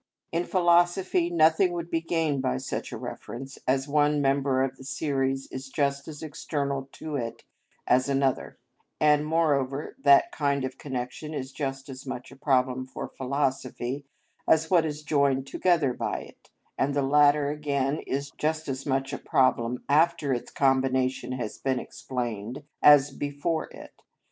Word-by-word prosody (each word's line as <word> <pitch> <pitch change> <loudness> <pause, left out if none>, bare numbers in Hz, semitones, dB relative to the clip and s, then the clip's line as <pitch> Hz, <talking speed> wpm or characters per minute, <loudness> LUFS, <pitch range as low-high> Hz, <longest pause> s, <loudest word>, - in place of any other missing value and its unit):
In 170 +1 0
philosophy 175 0 +3
nothing 170 +2 +4
would 170 -1 -5
be 165 - +1
gained 160 -4 0
by 65 - 0
such - - -4
a - - -5
reference, 135 +3 -7
as 135 +1 +1
one 150 0 +2
member 135 -1 +2
of 135 -1 -2
the - - -12
series 135 -1 -1
is 130 0 -6
just 140 -1 -1
as 155 -1 -8
external 140 -3 -3
to 155 -2 -6
it 115 -4 -4 0.4
as 130 +2 +3
another; 135 -1 0 0.4
and, 150 -1 +4
moreover, 150 -3 0
that 140 0 +6
kind 140 -2 0
of 130 0 -7
connection 135 +3 -5
is 130 -1 -4
just 135 -1 -4
as 135 0 -9
much 125 -1 -6
a - - -12
problem 130 -2 +1
for 130 - -6
philosophy 135 0 -2 0.4
as 160 +1 +3
what 170 -3 +4
is 150 0 -5
joined 140 -3 +2
together 160 -4 +1
by - - -3
it, - - -16 0.3
and 140 +1 +1
the 140 - +2
latter 145 +1 +4
again 145 -1 -1
is 140 +1 -2
just 155 +1 -2
as 135 0 -4
much 135 0 0
a - - -3
problem 125 -2 +1
after 150 -1 +3
its 120 - -4
combination 130 -1 +1
has 120 -4 -5
been 130 -2 0
explained 120 0 -5 0.2
as 145 -1 +7
before 145 +4 -2
it. - - -12
140 Hz, 160 wpm, -27 LUFS, 130-150 Hz, 0.4 s, as